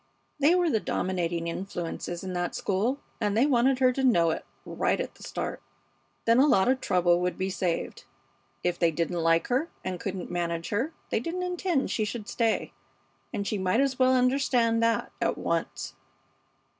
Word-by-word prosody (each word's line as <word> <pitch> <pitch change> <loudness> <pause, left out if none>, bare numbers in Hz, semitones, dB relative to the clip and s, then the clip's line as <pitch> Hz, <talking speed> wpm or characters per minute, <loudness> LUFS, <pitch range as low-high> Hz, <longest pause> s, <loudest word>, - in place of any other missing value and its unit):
They 300 +5 +5
were 350 -3 +2
the 220 - +2
dominating 175 -4 -1
influences 175 -1 -4
in 185 -1 -4
that 175 0 -2
school, 220 +9 0 0.2
and 210 -1 0
they 245 - +5
wanted 260 -1 +3
her 255 -1 +4
to 270 - -2
know 170 -10 +4
it, - - -4 0.2
right - - 0
at - - -3
the - - -20
start; - - -4 0.6
then 230 +2 +5
a 280 - +6
lot 195 -8 +4
of 260 +1 +2
trouble 175 -1 +3
would 180 0 -1
be 190 +1 -1
saved. 180 -2 -2 0.6
If 175 0 0
they 170 - +4
didn't 170 +1 -1
like 165 0 +2
her 265 +7 +1 0.2
and 185 -1 -3
couldn't 190 -5 -5
manage 170 -1 -2
her 240 +10 -1 0.2
they - - +2
didn't 340 +9 -3
intend 360 -5 0
she 220 - 0
should 210 0 -4
stay, 230 -2 0 0.6
and 200 - -3
she 210 0 -1
might 185 +4 +1
as 270 -1 +1
well 260 0 +5
understand 250 -3 +2
that 230 0 +1
at - - +1
once. - - -2
215 Hz, 180 wpm, -28 LUFS, 180-260 Hz, 0.6 s, a